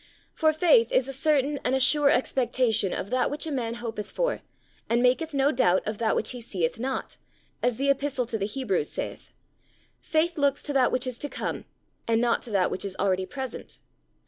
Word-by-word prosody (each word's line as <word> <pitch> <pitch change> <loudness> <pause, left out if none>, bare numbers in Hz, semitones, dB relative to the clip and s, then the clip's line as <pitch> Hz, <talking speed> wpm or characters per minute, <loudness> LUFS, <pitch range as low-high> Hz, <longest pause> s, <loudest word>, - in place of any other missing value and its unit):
For 315 -1 +3
faith 310 -8 +4
is 260 - +2
a 270 - -5
certain 285 0 +1
and 255 - +1
a - - +2
sure 290 +2 +4
expectation 245 -6 +1
of 200 - -4
that 255 0 +2
which 295 +3 -3
a 315 - -4
man 235 -4 -2
hopeth 225 -3 -5
for, - - -1 0.5
and 235 +1 +3
maketh 280 +6 +2
no 280 0 +2
doubt 185 -9 +2
of 215 0 -3
that 225 -2 +1
which 215 - 0
he 250 -2 -7
seeth 185 -4 -2
not, 265 +2 -3 0.4
as 245 -2 +1
the 275 +1 +3
Epistle 275 -2 -1
to 225 -1 -3
the 200 - -1
Hebrews 210 - -1
saith: - - -6 0.7
Faith 320 +1 0
looks 280 -1 +1
to 290 - -3
that 260 -2 +3
which 255 +1 +1
is 255 -2 -4
to 290 - -3
come, - - -4 0.4
and 225 -1 +2
not 235 0 +1
to - - -10
that 195 -4 +1
which - - -2
is 195 -2 -4
already 190 -1 0
present. 265 -3 -7
255 Hz, 205 wpm, -26 LUFS, 225-280 Hz, 0.7 s, faith